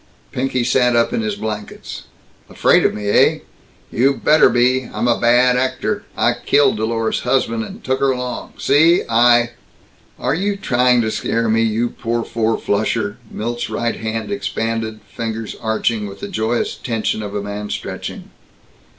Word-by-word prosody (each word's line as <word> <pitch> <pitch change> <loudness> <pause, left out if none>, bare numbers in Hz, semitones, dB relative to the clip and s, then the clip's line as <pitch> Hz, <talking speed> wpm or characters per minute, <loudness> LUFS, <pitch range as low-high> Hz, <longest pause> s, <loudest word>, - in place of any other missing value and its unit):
Pinky 130 -1 -1
sat 125 0 +2
up 115 - +2
in 235 - 0
his 215 -2 -2
blankets. 105 - -6 0.4
"Afraid - - +3
of - - -4
me, 105 -1 -5
eh? - - +4 0.5
You 135 +4 +2
better 155 +3 +5
be! 125 +1 +2
I'm 120 - -1
a 120 - +2
bad 125 +1 +4
actor. 130 - -1
I - - +3
killed 140 -5 +3
Dolores's 110 +1 -1
husband, 115 -4 0
and - - -10
took 130 +1 0
her 135 - +2
along, 125 -1 -4
see? 160 +5 +4
I 120 +1 +4 0.3
" - - -33
"Are - - +3
you 200 +5 0
trying 125 -8 +2
to 110 -1 -1
scare 115 +1 -1
me, 110 +1 +2
you 115 +1 +1
poor 115 0 -3
four 115 -1 -1
flusher?" 105 +1 -1
Milt's 120 +2 -4
right 120 0 -2
hand 110 - -4
expanded, 115 - -3
fingers 110 +1 -5
arching, 110 -1 -1
with 100 0 -10
the - - -5
joyous 110 +2 -1
tension 110 -2 -2
of 105 -1 -6
a 100 - -2
man 105 0 -5
stretching. - - -6
120 Hz, 165 wpm, -19 LUFS, 110-130 Hz, 0.5 s, better